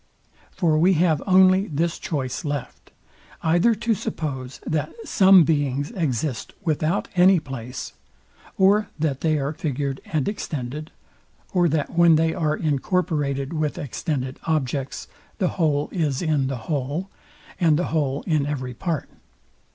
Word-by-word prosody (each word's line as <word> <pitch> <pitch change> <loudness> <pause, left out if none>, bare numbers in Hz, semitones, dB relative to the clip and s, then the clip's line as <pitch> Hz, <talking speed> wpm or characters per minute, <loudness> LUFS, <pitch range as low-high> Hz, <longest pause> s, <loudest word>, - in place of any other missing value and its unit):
For 160 -4 +1
we 180 +4 +5
have 160 -3 +2
only 190 +1 +5
this 165 +3 -1
choice 140 -3 -3
left, 145 -3 -5 0.5
either 175 +8 +3
to 230 +2 0
suppose 135 -9 -4
that 155 -1 -1
some 190 -3 +6
beings 145 - 0
exist 150 - -2
without 160 +2 0
any 180 0 +6
place; 130 -4 -7 0.6
or 200 +2 +4
that 150 -4 -1
they 155 -2 +2
are 140 +1 -2
figured 140 -3 -3
and 155 -4 -1
extended; 150 - -4 0.6
or 175 -2 +3
that 150 -1 -1
when 170 -1 +5
they 160 +1 +2
are 155 -2 0
incorporated 145 -2 -1
with 155 -2 -1
extended 135 -1 -3
objects, 140 -4 -2 0.3
the 185 - +1
whole 150 -4 0
is 150 -5 -1
in 150 -5 +1
the 135 -1 -3
whole, 150 +5 -2 0.5
and 160 -5 +4
the 175 - -1
whole 140 -3 0
in 155 -4 +1
every 130 -4 -3
part. 165 +2 -3
155 Hz, 135 wpm, -23 LUFS, 140-170 Hz, 0.6 s, some